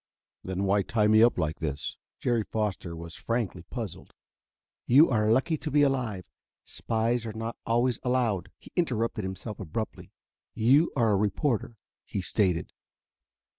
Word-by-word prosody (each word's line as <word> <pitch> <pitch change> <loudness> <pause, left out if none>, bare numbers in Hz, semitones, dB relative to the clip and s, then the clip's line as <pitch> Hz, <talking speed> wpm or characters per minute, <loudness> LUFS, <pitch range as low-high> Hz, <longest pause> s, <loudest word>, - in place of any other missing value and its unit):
"Then 95 +1 -2
why 100 +1 +3
tie 105 +2 +1
me 110 +1 +6
up 120 +1 +5
like 80 0 -1
this?" 75 -3 -3 0.2
Jerry 120 -2 +1
Foster 100 -6 -3
was 85 0 -8
frankly 115 -6 -2
puzzled. 110 +1 -7 0.7
"You 140 +5 +6
are 110 -2 +2
lucky 135 +7 +2
to 155 - -5
be 145 0 +4
alive. 120 - 0 0.4
Spies 115 +1 -1
are 110 - -5
not 115 +1 -4
always 120 +1 +2
allowed 125 -7 0
" - - -65
He - - -16
interrupted 115 - 0
himself 95 +3 -6
abruptly. 100 +4 -5 0.4
"You 130 +9 +4
are 115 -5 +3
a - - +4
reporter," 110 +3 0 0.3
he - - -4
stated. 90 -2 0
110 Hz, 150 wpm, -28 LUFS, 95-120 Hz, 0.7 s, me